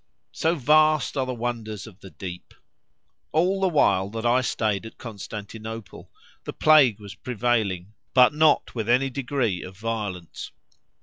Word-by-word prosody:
So 165 +2 0
vast 155 +2 +3
are 130 -2 -1
the 130 - -2
wonders 115 -3 -4
of 105 -4 -14
the 95 - -12
deep! 90 -1 -9 0.8
All 185 +5 +1
the 190 - +3
while 100 - +2
that 115 +2 -5
I 120 +2 +4
stayed 110 -5 -1
at - - -14
Constantinople 110 0 -8 0.3
the - - -6
plague 145 -9 +5
was 100 -2 -9
prevailing, 110 -6 -1 0.2
but 125 +1 +6
not 155 0 +3
with 115 -2 -3
any 130 +3 +3
degree 125 -7 -1
of 95 0 -10
violence. 105 -6 -5
115 Hz, 145 wpm, -25 LUFS, 105-135 Hz, 0.8 s, but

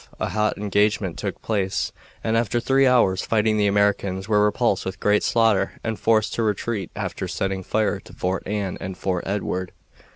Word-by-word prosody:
A - - -1
hot 105 +3 0
engagement 105 -2 0
took - - -4
place, 100 -4 -1 0.3
and 110 0 +1
after 115 +1 +1
three 135 +3 +3
hours' 115 -7 +3
fighting 110 -1 +2
the 105 -1 +3
Americans 100 -1 +1
were 105 -1 +3
repulsed 105 -1 +1
with 95 0 -5
great 105 0 +3
slaughter 115 -4 +2
and 110 -1 -3
forced 110 -1 +2
to - - -1
retreat 105 -2 -1
after - - -4
setting 95 -1 -2
fire 105 +3 0
to - - -15
Fort 95 +1 -2
Anne 100 -2 -2
and 95 -1 -5
Fort 90 -2 -2
Edward. 95 -2 -2
105 Hz, 175 wpm, -23 LUFS, 95-110 Hz, 0.3 s, three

